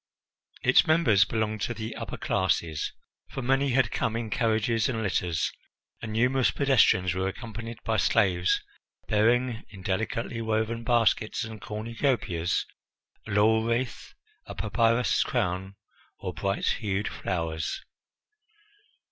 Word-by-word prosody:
Its - - +5
members 120 - +5
belonged 110 -1 -2
to 120 - -2
the 110 0 -5
upper - - -6
classes, 85 -4 0 0.4
for 135 - -5
many 135 +2 +2
had 130 -4 +3
come 115 - -1
in 115 -2 -3
carriages 115 0 +1
and 115 -3 -2
litters, 90 -5 0 0.5
and 110 - -5
numerous 125 +3 +3
pedestrians 115 -10 +3
were 95 +1 -1
accompanied 115 +2 -6
by 110 -1 0
slaves 90 -1 +3 0.5
bearing 120 +2 +2
in 95 -3 -12
delicately 115 +4 -2
woven 110 +1 -1
baskets 115 -3 +2
and 110 -2 -8
cornucopias 110 - -1 0.6
a - - -6
laurel 110 +2 +4
wreath, 120 +2 -2 0.3
a - - -7
papyrus 115 +3 +2
crown, 95 +2 -1 0.4
or 90 - -5
bright 100 +4 -2
hued 100 -1 -1
flowers. 80 -3 -3
110 Hz, 120 wpm, -27 LUFS, 95-115 Hz, 0.6 s, Its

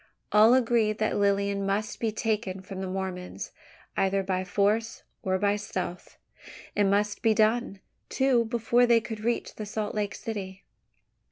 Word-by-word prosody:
All 215 +4 +7
agreed 230 -4 +2
that 215 - 0
Lilian 200 0 +1
must 205 +2 -1
be 225 -2 0
taken 210 -3 -2
from 190 0 -7
the 190 - -3
Mormons, 185 -1 -5 0.4
either 195 0 +1
by 185 -1 -1
force 210 +4 0 0.2
or 190 -2 0
by 205 +1 +1
stealth. 185 -3 -5 0.6
It 205 - +3
must 205 +1 +1
be 225 -2 +3
done, 215 -2 +1 0.3
too, 260 -3 +2
before 235 +1 +2
they 235 -1 +5
could 220 -1 -6
reach 235 +2 -1
the 215 - -4
Salt 210 0 -3
Lake 205 -1 -2
city. 195 -4 -6
210 Hz, 155 wpm, -27 LUFS, 195-225 Hz, 0.6 s, All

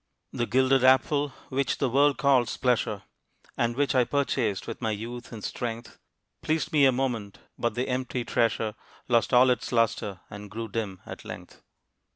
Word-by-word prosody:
The 120 - -1
gilded 130 0 +3
apple 140 +3 +4 0.2
which 135 +1 0
the 135 - +1
world 140 +3 +3
calls 130 -4 +2
pleasure, 115 -5 0 0.5
And 120 0 0
which 145 +1 +1
I 130 -2 +4
purchased 120 -7 -1
with - - -7
my 110 - 0
youth 115 +3 -5
and 110 -3 -8
strength, 115 -1 -5 0.4
Pleased 160 +1 -1
me 145 -2 +5
a - - +5
moment. 120 -6 -2 0.2
But 120 - -2
the 125 +1 -1
empty 125 -1 -2
treasure 115 -2 0 0.3
Lost 120 -2 +2
all 125 0 +6
its 125 - -2
lustre, 115 -5 0
and 105 0 -9
grew 115 +2 -5
dim 100 -4 -4
at - - -9
length. - - -10
120 Hz, 170 wpm, -27 LUFS, 115-130 Hz, 0.5 s, all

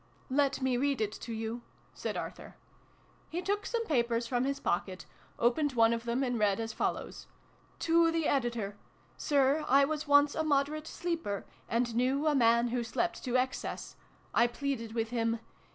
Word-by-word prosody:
" - - -32
Let 280 -1 0
me 255 -2 +2
read 280 0 +1
it 215 -2 0
to 230 - -8
you," 225 +1 -4 0.3
said - - -4
Arthur. - - -7 0.7
He 335 - -3
took 405 +3 -1
some 460 -1 -1
papers 235 - +1
from 245 +1 0
his 275 0 -1
pocket, 185 -2 -2 0.3
opened 270 +4 +2
one 230 -1 +4
of 230 0 -3
them, 240 +3 0
and 245 -3 -1
read 205 -1 +2
as 225 -1 -3
follows. - - -3 0.5
To 335 0 +4
the 330 -2 0
Editor. 235 -6 -1 0.4
Sir, 285 +1 +2
I 275 +1 +6
was 305 +1 -3
once 285 0 +5
a - - -1
moderate 300 +1 0
sleeper, 330 - -3 0.2
and 235 +1 0
knew 260 +5 +1
a 305 - +4
man 235 -2 +4
who 240 0 -1
slept 345 +9 -2
to 250 0 +2
excess. 255 0 -3 0.4
I 235 - +5
pleaded 240 -3 -4
with 225 0 -1
him. 230 -1 0
250 Hz, 175 wpm, -31 LUFS, 230-290 Hz, 0.7 s, I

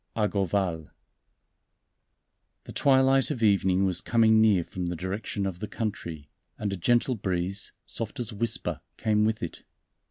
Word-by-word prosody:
X 105 -2 0
Argoval 95 -5 -1 1.7
THE - - -10
twilight 135 -1 +4
of 130 -7 -3
evening 95 -2 +3
was 95 -2 +1
coming 110 -1 +4
near 105 -5 +4
from 90 +1 -5
the 90 - -2
direction 100 +3 -3
of 95 -3 -4
the 105 - -4
country, 85 -10 -5 0.3
and 100 -2 -2
a - - -1
gentle 120 +7 +2
breeze, 95 -2 -2
soft 115 +5 -4
as 120 -1 -2
a - - -9
whisper, 115 +2 -2 0.2
came 105 -1 +2
with 110 -2 -1
it. 85 - -6
100 Hz, 155 wpm, -27 LUFS, 95-115 Hz, 1.7 s, twilight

